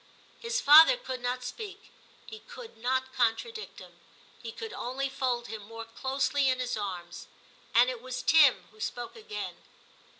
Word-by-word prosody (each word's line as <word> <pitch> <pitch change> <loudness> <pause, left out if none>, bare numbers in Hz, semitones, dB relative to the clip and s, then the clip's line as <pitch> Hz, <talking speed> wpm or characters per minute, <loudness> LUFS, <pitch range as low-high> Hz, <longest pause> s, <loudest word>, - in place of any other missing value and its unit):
H - - -13
is 475 +1 0
father 320 +10 +9
could 260 - -6
not 250 +1 -2
speak: 405 - -8 0.3
he 440 - -10
could 480 -1 -12
not 260 +3 -1
contradict 270 - -1
him, - - -14 0.4
he 230 - -6
could 445 - -8
only 270 +2 -3
fold 250 -3 -1
him 220 -2 -7
more 225 +2 -9
closely 270 +4 0
in 255 0 0
his 250 -1 -2
arms; 185 -5 -6 0.5
and 240 +2 +7
it 250 -2 -4
was 255 0 -5
Tim 295 -5 +5
who 215 - -21
spoke 240 +2 -5
again. 440 -1 -6
255 Hz, 165 wpm, -29 LUFS, 240-325 Hz, 0.5 s, father